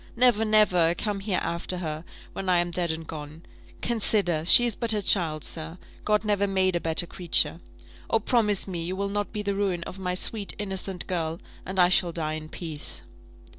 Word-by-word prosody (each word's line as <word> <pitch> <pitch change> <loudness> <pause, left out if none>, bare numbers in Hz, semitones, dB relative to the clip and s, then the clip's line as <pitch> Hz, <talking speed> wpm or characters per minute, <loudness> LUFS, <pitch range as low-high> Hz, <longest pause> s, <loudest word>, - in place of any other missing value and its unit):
Never, 240 -2 +3
never 185 -6 +3
come 205 +2 -3
here 195 -1 -2
after 170 +2 -2
her, 155 -3 -5 0.3
when 190 -1 -4
I 180 - +4
am 175 0 0
dead 175 0 -2
and 160 0 -3
gone! 155 +1 -9 0.4
Consider, 205 -8 +1
she 240 - +9
is 235 -4 0
but 230 -2 0
a 210 -1 -2
child, 160 -7 +4
sir. 165 +1 0 0.3
God 210 +1 +1
never 200 -1 +1
made 190 -2 +1
a - - +1
better 165 +1 +1
creature. 170 -1 +1 0.5
Oh, - - +3
promise 215 -3 0
me 175 -3 -4
you 180 +3 -4
will 200 +1 -3
not 205 0 -3
be 210 - -4
the 200 -1 -1
ruin 195 -4 -2
of 190 - -9
my 180 -1 -2
sweet 200 +2 -2
innocent 195 -2 -3
girl, 165 -2 -3 0.3
and 190 +1 -6
I 180 0 +5
shall 180 -1 +3
die 155 -2 -3
in 155 0 -7
peace!" 160 -4 -2
185 Hz, 200 wpm, -25 LUFS, 170-205 Hz, 0.5 s, she